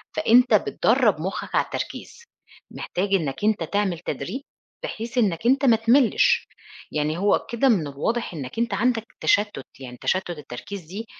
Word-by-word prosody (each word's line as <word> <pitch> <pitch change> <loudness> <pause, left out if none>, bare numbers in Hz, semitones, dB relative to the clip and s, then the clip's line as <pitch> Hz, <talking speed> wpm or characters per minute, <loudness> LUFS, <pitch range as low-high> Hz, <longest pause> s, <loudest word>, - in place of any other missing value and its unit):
فأنت 250 -4 +4
بتدرّب 220 - +2
مُخّك 190 +4 -4
على - - +3
التركيز. 470 - -6 0.5
محتاج 195 +2 -3
إنّك 160 +1 -2
أنت 210 -5 +2
تعمل 190 -1 -1
تدريب 175 - -5 0.4
بحيث 235 - -5
إنّك 200 -5 +1
أنت 265 +3 +3
ما 235 -4 +6
تملِّش. 245 - +3 0.4
يعني 150 +1 -1
هو 200 +3 +2
كده 240 +3 +2
من 180 - +2
الواضح 180 +12 -2
إنّك 145 - -6
أنت 235 -3 0
عندك 225 +2 +1 0.2
تشتُّت، 205 -9 +1
يعني 125 -2 -9
تشتُّت 185 -1 0
التركيز 150 +8 -8
دي، 195 +8 -7
205 Hz, 150 wpm, -24 LUFS, 165-235 Hz, 0.5 s, ما